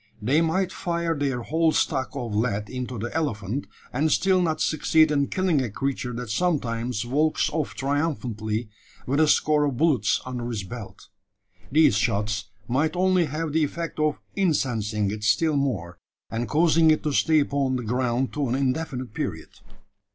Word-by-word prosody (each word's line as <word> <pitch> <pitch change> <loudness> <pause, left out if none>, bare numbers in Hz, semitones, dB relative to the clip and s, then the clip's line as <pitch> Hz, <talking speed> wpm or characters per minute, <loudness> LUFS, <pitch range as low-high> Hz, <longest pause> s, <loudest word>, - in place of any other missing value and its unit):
They 130 +9 +2
might 175 +3 +1
fire 170 -1 -2
their 135 -4 -1
whole 160 +5 +2
stock 135 -2 0
of 120 -5 -4
lead 105 -1 -1
into 125 -1 -4
the 115 +3 -4
elephant, 135 -6 -2 0.3
and 150 +5 +1
still 190 -1 +3
not 160 -3 0
succeed 155 0 +3
in 140 -2 +2
killing 185 -6 +1
a 125 - -2
creature 130 +2 -3
that 120 -2 -5
sometimes 120 -8 -1
walks 150 +5 +1
off 155 -2 -2
triumphantly 125 -7 -2 0.4
with 140 +4 0
a 160 - +5
score 150 0 +3
of 140 -4 -2
bullets 135 -10 +2
"under 125 -2 -4
his 110 -5 -3
belt." 110 +1 -9 0.6
These 150 -8 +5
shots 105 -1 0 0.2
might 145 +7 +1
only 185 -1 +3
have 155 +1 -3
the 160 0 +3
effect 165 +2 -4
of 155 -1 +1 0.2
incensing 115 - 0
it 105 0 -6
still 155 +8 +2
more, 105 -12 -2 0.3
and 115 +1 -2
causing 160 +1 +4
it 155 - +3
to 150 - -1
stay 155 +1 +4
upon 140 -2 0
the 125 - -3
ground 125 +2 0
to 145 -4 -1
an 125 - +1
indefinite 130 -3 -2
period. 80 -7 -4
135 Hz, 165 wpm, -25 LUFS, 115-155 Hz, 0.6 s, a